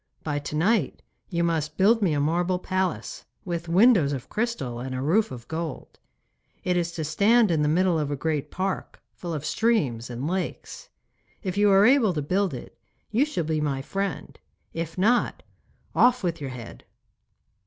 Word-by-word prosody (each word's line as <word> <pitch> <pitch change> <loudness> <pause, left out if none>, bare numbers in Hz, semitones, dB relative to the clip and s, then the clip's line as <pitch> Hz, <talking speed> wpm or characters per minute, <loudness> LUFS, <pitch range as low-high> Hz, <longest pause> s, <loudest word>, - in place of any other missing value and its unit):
By 145 -2 -1
to 145 +1 -6
night 180 - +1 0.3
you 170 -1 0
must 155 -2 -1
build 220 +4 +4
me 180 -6 +2
a 145 - 0
marble 175 +5 +1
palace, 185 -1 -2 0.2
with 170 -2 -4
windows 180 - +5
of 130 -3 -6
crystal 215 - -2
and 130 +1 -5
a - - -2
roof 195 +9 +2
of 120 -2 -9
gold. 160 -2 -6 0.6
It 180 - +1
is 170 -1 0
to 160 - -3
stand 205 +8 +3
in 160 -2 +2
the 150 - +2
middle 175 +1 +2
of 150 -2 -1
a 145 - -1
great 150 0 -2
park, 190 +1 -3
full 175 - -6
of 155 -2 -4
streams 145 - 0
and 125 +4 -4
lakes. 185 +2 -4 0.5
If 185 -3 -3
you 205 0 +4
are 195 +1 +6
able 245 -6 +4
to 150 - -2
build 185 +1 0
it 125 - -10 0.4
you 240 +7 +3
shall 245 - -2
be 155 0 -1
my 135 -3 -1
friend. 195 0 -4 0.3
If 165 0 -5
not, 230 +6 +2 0.5
off 250 -1 +4
with 170 -4 -2
your 140 - -4
head. 120 - -9
170 Hz, 180 wpm, -25 LUFS, 150-195 Hz, 0.6 s, are